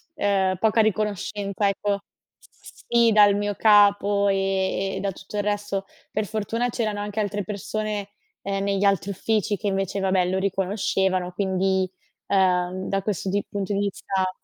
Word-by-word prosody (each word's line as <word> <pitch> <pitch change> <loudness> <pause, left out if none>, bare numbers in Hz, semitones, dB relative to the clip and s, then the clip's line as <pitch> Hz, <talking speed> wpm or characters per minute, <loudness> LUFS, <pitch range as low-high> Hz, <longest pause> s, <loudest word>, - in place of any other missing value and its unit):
ehm, 195 - +1
poca 220 +1 +3
riconoscenza, 205 -1 -1
ecco. 200 +1 -1 0.4
S - - -17
sì 235 -1 +4
dal 205 -1 +6
mio 205 0 -1
capo 205 -1 +4
e 195 0 0
e - - -3
da 200 - -1
tutto 195 +2 -9
il 205 - 0
resto. 205 -1 -2 0.3
Per 215 0 -1
fortuna 225 +3 -2
c'erano 215 -3 -2
anche 205 +1 -4
altre 205 -1 -1
persone, 210 0 -4 0.3
ehm, 195 0 -2
negli 200 0 0
altri 200 0 +2
uffici 210 +1 0
che 210 - -4
invece, 195 0 -1
vabbè, 190 -1 +2
lo 190 - 0
riconoscevano, 190 -1 0
quindi, 190 -1 0 0.4
ehm, 185 -1 +1
da 195 0 0
questo 195 -1 -2
di 200 +1 -1
punto 200 0 -3
di 200 - 0
vista 190 -1 -1
200 Hz, 160 wpm, -24 LUFS, 190-205 Hz, 0.4 s, dal